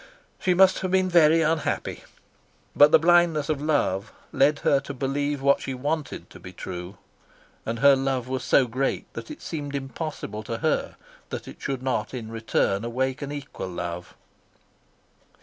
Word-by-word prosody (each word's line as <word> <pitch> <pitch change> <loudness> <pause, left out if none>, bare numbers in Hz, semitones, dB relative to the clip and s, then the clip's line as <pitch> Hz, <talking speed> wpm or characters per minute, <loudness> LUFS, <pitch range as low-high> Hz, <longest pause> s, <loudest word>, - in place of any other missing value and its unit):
She 180 -1 +2
must 190 +1 +5
have 185 - -2
been 185 0 +2
very 165 -2 +5
unhappy. 155 -1 -1 0.7
But 145 +1 +7
the - - +8
blindness 165 -2 +3
of 150 -2 -1
love 135 -9 0 0.2
led 145 +2 +3
her 140 - +4
to 140 - -8
believe 140 +1 -2
what 140 0 +4
she 135 - -4
wanted 145 +3 -3
to - - -12
be 90 - -10
true, 90 +1 -7 0.7
and 115 +1 -2
her 140 +3 +6
love 135 -2 -1
was 130 0 -3
so 135 - +4
great 130 +3 -2
that - - -7
it 305 - -9
seemed 145 -3 -5
impossible 135 -5 -5
to - - -4
her - - -1 0.3
that - - -6
it - - -11
should 135 -2 -3
not 130 -2 -1
in 115 -3 -6
return 110 -2 0
awake 130 +4 -2
an 140 0 -4
equal 140 -9 -6
love. 85 0 -6
135 Hz, 165 wpm, -25 LUFS, 120-155 Hz, 0.7 s, the